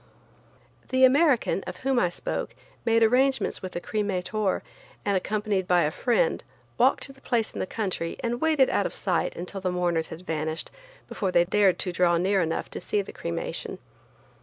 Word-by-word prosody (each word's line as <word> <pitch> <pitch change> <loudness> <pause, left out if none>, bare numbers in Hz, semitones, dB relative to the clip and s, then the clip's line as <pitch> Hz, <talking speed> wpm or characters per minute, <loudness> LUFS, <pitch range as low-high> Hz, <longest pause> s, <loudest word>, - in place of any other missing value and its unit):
The 260 0 +5
American, 265 - +3
of 180 - -6
whom 265 -2 +3
I 180 - +2
spoke, 175 - -4 0.3
made 230 0 +4
arrangements 250 -1 +2
with 185 -1 -7
a - - -1
cremator, 205 0 -1 0.4
and, 200 -1 +2
accompanied 205 -1 -1
by 180 -1 +4
a 150 - +1
friend, 370 - +1 0.4
walked - - +4
to 275 - -5
the 270 - -22
place 230 -3 0
in - - -6
the - - -2
country 185 -6 -3
and 240 +1 -1
waited 310 -5 +3
out 200 - +1
of - - -8
sight 180 -4 -1
until 180 +3 -6
the 185 - 0
mourners 175 -2 0
had 160 - -9
vanished 160 -1 -3 0.4
before 195 -3 -2
they 175 -1 +4
dared 195 0 +3
to 180 - -1
draw 175 -1 +3
near 190 +2 +2
enough 165 -1 -1
to - - -6
see 205 +3 0
the - - -10
cremation. 85 - -4
195 Hz, 185 wpm, -26 LUFS, 180-235 Hz, 0.4 s, The